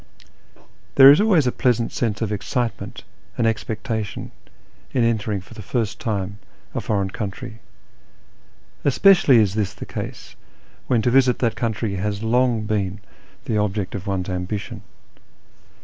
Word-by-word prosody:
There 135 0 +10
is 150 - +5
always 190 -10 +4
a 125 - +2
pleasant 120 -2 +1
sense 115 -3 -1
of 105 - -2
excitement 115 +3 -3 0.3
and 115 - +1
expecta 110 +1 -1
tion 100 - -8 0.6
in 125 - +2
entering 110 -3 0
for 95 - -15
the 110 - -9
first 110 +1 -2
time 100 -3 -3 0.3
a - - -2
foreign 100 -3 -1
country. 110 +3 -6 1.2
Especially 145 -2 +5
is 105 -4 +3
this 100 -3 -2
the - - -8
case - - -7 0.5
when 120 -4 +2
to 120 - +2
visit 130 -1 +4
that 115 -2 0
country 110 -3 -2
has 100 +2 -2
long 120 -1 +2
been 100 -2 -2 0.5
the 110 -3 0
object 100 -2 -1
of 100 0 -6
one's 95 -2 -2
ambition. 95 +2 -4
110 Hz, 145 wpm, -22 LUFS, 100-120 Hz, 1.2 s, There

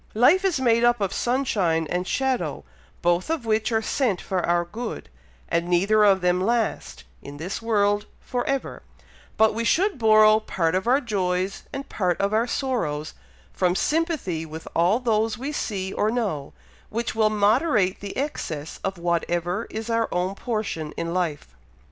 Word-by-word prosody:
Life 300 - +5
is 370 -7 +1
made 235 -2 +3
up 240 -1 +4
of 195 -2 -1
sunshine 205 -11 +1
and 180 +1 -1
shadow, 265 -2 -1 0.4
both 175 - +1
of 320 -7 -2
which 220 +1 +1
are 225 0 +1
sent 220 -7 0
for 185 -2 -2
our 175 0 +1
good, 220 +6 -6 0.4
and 170 +1 0
neither 195 +5 +3
of 195 -2 +5
them 180 0 +2
last, 230 - -1 0.2
in 145 0 -9
this 175 +8 -5
world, 205 -2 +1
for 245 -1 -3
ever; 275 -1 -2 0.6
but 220 0 +4
we 230 +2 -2
should 365 - +2
borrow 215 -1 +6
part 170 -6 -1
of 190 +4 -1
our 260 +4 +4
joys, 190 -5 -2
and 275 0 -6
part 180 -4 -1
of 200 +1 0
our 225 +2 +2
sorrows, 170 - -2 0.4
from 180 -1 +1
sympathy 300 - 0
with 160 0 -9
all 175 +6 +3
those 225 -3 0
we 270 +4 -4
see 195 -9 -3
or 210 - +1
know, 205 - -2 0.4
which 230 +2 -2
will 220 -1 +3
moderate 210 - +2
the 200 -1 -7
excess 160 - -4
of 195 -1 -2
whatever 175 +3 -1
is 220 +1 -5
our 230 -1 0
own 180 +2 -1
portion 200 -9 -3
in 170 0 -3
life." 155 - -3
210 Hz, 165 wpm, -24 LUFS, 180-235 Hz, 0.6 s, borrow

